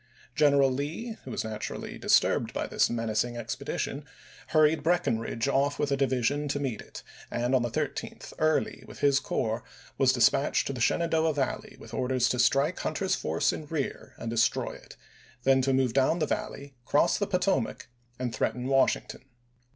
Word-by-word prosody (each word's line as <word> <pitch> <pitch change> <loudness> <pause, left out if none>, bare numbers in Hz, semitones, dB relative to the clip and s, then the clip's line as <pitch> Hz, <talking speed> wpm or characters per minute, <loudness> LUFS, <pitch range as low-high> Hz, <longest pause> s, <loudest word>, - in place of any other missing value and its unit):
General 140 -1 +4
Lee, 160 - -4
who - - -7
was - - -3
naturally 110 -1 -5
disturbed - - +2
by - - -1
this - - +2
menacing 115 +1 -1
expedition, 140 +4 -4 0.4
hurried 155 0 +3
Breckinridge 115 -8 0
off 140 +1 +1
with 145 - -1
a - - +3
division 135 +2 0
to 145 0 -1
meet 130 -6 -3
it, - - -11 0.3
and 120 +2 -1
on 130 - +4
the 120 - -1
13th - - -4
Early, 155 0 +2
June.ise*. - - -17
with - - -11
his 140 -1 +4
corps, 115 -4 -2 0.4
was 130 -1 +5
dispatched 130 +3 +3
to 140 - -3
the 125 - -5
Shenandoah 160 +3 +2
Valley, 135 -2 -3
with - - -12
orders 130 -1 +1
to 125 - -1
strike 135 +7 +3
Hunter's 185 +4 -1
force 80 +1 0
in 155 - -7
rear 145 -3 -4
and 115 - -5
destroy 115 0 +1
it; - - -13 0.5
then 135 0 +4
to 135 +1 +1
move 130 -3 +2
down 135 +5 +3
the 160 - +1
Valley, 140 -1 -4
cross 145 - +2
the 205 - 0
Potomac, 180 - 0 0.3
and 125 -2 -3
threaten 125 +2 -1
Washington. 135 -1 +1
135 Hz, 175 wpm, -28 LUFS, 120-150 Hz, 0.5 s, was